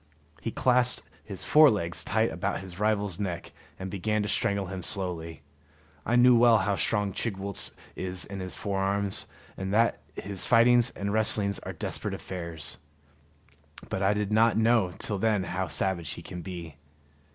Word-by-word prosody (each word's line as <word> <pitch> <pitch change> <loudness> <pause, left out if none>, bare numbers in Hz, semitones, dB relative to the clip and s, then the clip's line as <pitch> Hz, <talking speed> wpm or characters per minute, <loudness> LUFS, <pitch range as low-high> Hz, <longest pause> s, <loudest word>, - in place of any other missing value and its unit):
He - - -2
clasped 125 -1 +1 0.2
his 95 -3 -6
fore 155 0 +7
legs 85 -7 -2
tight - - +1
about - - -2
his 95 -1 -11
rival's 105 -3 0
neck 90 -4 -4 0.3
and 95 0 -6
began 105 +2 -1
to - - -2
strangle 100 -1 0
him 95 0 -6
slowly. 85 -4 -2 0.6
I 120 - +2
knew 125 0 +7
well 115 -1 +6
how 100 0 0
strong 105 -1 0
Chigwooltz 100 -3 -3 0.2
is 90 -1 -2
in 100 -1 -7
his 95 0 -5
forearms, 100 0 0 0.3
and 95 0 -4
that 115 +1 +2
his 100 -2 -5
fightings 120 0 +5
and 100 +1 -4
wrestlings 105 -2 +4
are - - -7
desperate - - -3
affairs; 85 -4 -6 1.1
but 95 - -2
I 100 +1 +3
did 105 0 -2
not 110 +1 +4
know 110 -4 +3
till 105 -3 -2
then 105 -2 +1
how 95 0 -3
savage 85 +1 -1
he - - -9
can 90 - -7
be. 85 -4 -8
100 Hz, 165 wpm, -28 LUFS, 95-110 Hz, 1.1 s, fore